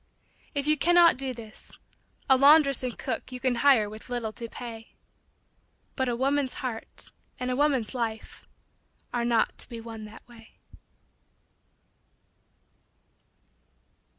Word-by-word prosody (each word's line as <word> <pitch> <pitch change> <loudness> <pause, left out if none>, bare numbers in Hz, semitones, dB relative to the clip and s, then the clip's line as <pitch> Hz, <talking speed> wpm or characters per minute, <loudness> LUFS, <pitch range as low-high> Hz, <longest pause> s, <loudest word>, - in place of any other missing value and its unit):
If 280 -1 -1
you 305 0 +3
cannot 345 +1 +6
do 265 0 -2
this 225 -3 -9 0.5
a 265 - +6
laundress 280 0 +6
and 250 -2 -4
cook 255 0 -4
You 250 - -6
can 255 -1 +1
hire, 265 -7 +5
with 215 +3 -10
little 240 -3 -3
to 230 0 -4
pay, 225 -2 -9 1.0
But 260 -2 0
a 240 - -1
woman's 270 +1 0
he, - - -5
art 225 -2 -6 0.3
and 250 0 -2
a - - 0
woman's 275 -5 +1
life 225 -3 -5 0.7
Are 240 -1 0
not 235 -2 +1
to - - -3
be 235 -2 -7
won 225 -1 -8
that 215 +1 -14
way. 230 -2 -17
245 Hz, 135 wpm, -27 LUFS, 225-275 Hz, 1.0 s, cannot